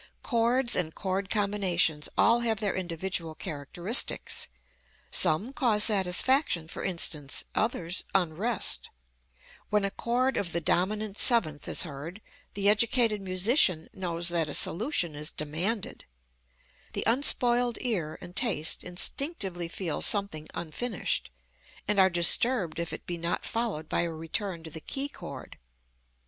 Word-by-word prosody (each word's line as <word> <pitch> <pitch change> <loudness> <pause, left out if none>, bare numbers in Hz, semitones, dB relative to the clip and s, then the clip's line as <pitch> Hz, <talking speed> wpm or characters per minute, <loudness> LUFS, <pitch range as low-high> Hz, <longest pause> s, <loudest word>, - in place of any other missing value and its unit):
Chords 240 0 +2
and 160 -3 0
chord 190 0 -3
combinations 190 -7 +1
all 235 +1 +5
have 225 -3 0
their 205 -3 -1
individual 170 -2 -3
characteristics. 175 - 0 0.6
Some 200 - +2
cause 225 -7 +3
satisfaction, 195 - +1
for - - -7
instance, 155 -6 0
others 180 -5 -1
unrest. 195 +5 0 0.8
When 210 -1 +2
a 195 - -2
chord 250 +5 0
of 180 -4 -2
the 170 - +1
dominant 205 +5 0
seventh 160 - +2
is - - +2
heard, 160 +4 -8 0.4
the 200 0 0
educated 220 0 +3
musician 185 - +2
knows 175 -2 -1
that 165 -3 0
a - - +1
solution 180 - +1
is 150 +1 -1
demanded. 175 +9 -3 0.9
The - - -2
unspoiled 245 -1 +2
ear 185 - -1
and 175 - -11
taste 190 - +1
instinctively 185 - -1
feel 170 -1 -4
something 200 -7 +2
unfinished, 185 +7 -3 0.6
and 205 0 +2
are 190 0 +6
disturbed 175 +1 +3
if 170 0 -3
it - - -7
be 175 -1 -5
not 170 +1 -2
followed 225 -10 -3
by - - 0
a 170 -1 -2
return 165 +2 -4
to 160 - -9
the 160 +1 -8
key 275 - -3
chord. - - -10
190 Hz, 130 wpm, -28 LUFS, 165-225 Hz, 0.9 s, are